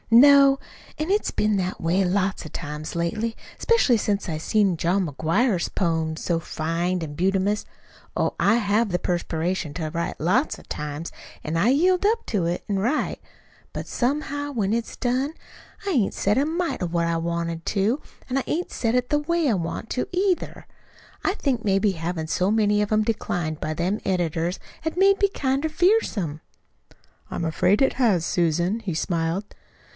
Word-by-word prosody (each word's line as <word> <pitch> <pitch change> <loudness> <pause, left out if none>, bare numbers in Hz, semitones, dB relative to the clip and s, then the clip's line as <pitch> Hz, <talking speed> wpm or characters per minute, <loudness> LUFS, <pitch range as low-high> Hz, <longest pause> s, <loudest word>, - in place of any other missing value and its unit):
"No. 275 +2 +8 0.4
An' 310 +3 -2
it's 415 +1 +2
been 215 0 +1
that 185 -1 -2
way 175 +4 +2
lots 190 +1 0
o' - - -7
times 150 0 -6
lately, 215 +7 -1 0.2
'specially 465 - +4
since 205 -1 -1
I 155 -3 -3
seen 200 +1 +2
John 180 +3 +1
McGuire's 170 - +1
poems 160 -3 -1
so 170 -2 0
fine 170 +3 -2
an' 155 -2 -5
bumtious! 195 +4 +1 0.5
Oh, - - +1
I 205 - +4
have 215 0 +2
the 180 -1 0
perspiration 175 -2 -2
to 155 -3 -3
write, 170 +1 -3
lots 210 - +1
o' - - -14
times, 150 +2 -5 0.3
an' 155 - -2
I 180 +8 +3
yield 360 +8 +3
up 455 +2 +2
to 195 -6 0
it 175 - -2
an' 200 -2 0
write. 245 +10 0 0.5
But - - -5
somehow, 285 +2 -1
when 215 -6 0
it's 230 0 -3
done, 260 +4 0 0.5
I - - +1
hain't 240 - +2
said 205 +3 +1
a 275 - +3
mite 335 - -2
what 170 0 0
I 170 - 0
want 170 0 -2
to, 215 +8 +1 0.3
an' 255 - 0
I - - +2
hain't 345 +6 -3
said 230 0 0
it 250 0 0
the 295 - +3
way 335 +1 0
I - - +3
want 170 +3 -3
to, 250 - -1
either. 370 0 -1 0.6
I 390 - +1
think 260 - -1
maybe 195 0 +2
havin' 165 -2 -3
so 185 +5 +1
many 210 -1 +3
of 210 - -1
'em 215 0 +3
disinclined 175 -8 -2
by 155 0 -2
them 180 +6 -1
editors 175 -1 -1 0.2
has 320 +2 -3
made 395 +1 +4
me 400 - +4
kinder 275 -2 -1
fearsome." 305 - +1 0.9
"I'm 170 - -3
afraid 180 - +2
it 270 - +4
has, 210 -10 +2
Susan," 175 +5 +1
he 185 -7 -3
smiled. 170 +3 -1
200 Hz, 175 wpm, -24 LUFS, 170-260 Hz, 0.9 s, No